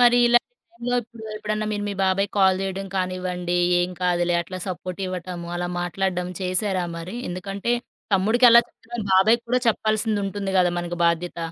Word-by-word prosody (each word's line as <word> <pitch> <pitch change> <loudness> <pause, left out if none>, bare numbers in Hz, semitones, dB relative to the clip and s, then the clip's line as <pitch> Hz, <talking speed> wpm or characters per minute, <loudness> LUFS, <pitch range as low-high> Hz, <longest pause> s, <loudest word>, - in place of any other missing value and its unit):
మరి 245 0 +6
ఇలాంటి 240 0 +4 0.3
టైములోప్పుడు, 240 -5 -3
ఎప్పుడన్నా 215 0 -2
మీరు 205 0 -2
మీ 200 - -3
బాబాయికి 195 +1 +1
కాల్ 190 -1 +4
చేయడం 195 0 -3
కానివ్వండి, 180 -1 -2 0.2
ఏం 175 - 0
కాదులే 175 -1 +2
అట్లా 185 +2 -7
సపోర్టివ్వటము, 180 0 -5
అలా 175 0 -2
మాట్లాడడం 180 0 -1
చేశారా 185 0 0
మరి? 180 +7 -6
ఎందుకంటే, 195 +5 -3 0.4
తమ్ముడికి 220 +6 +4
ఎలా 235 +1 +9
చెప్పారో, 235 0 -8
బాబాయికి 220 +5 +5
కూడా 250 0 +3
చెప్పాల్సిందుంటుంది 210 -3 0
కదా 180 -1 +4
మనకి 175 0 -4
బాధ్యత. 170 +1 -1
190 Hz, 145 wpm, -23 LUFS, 180-215 Hz, 0.4 s, ఎలా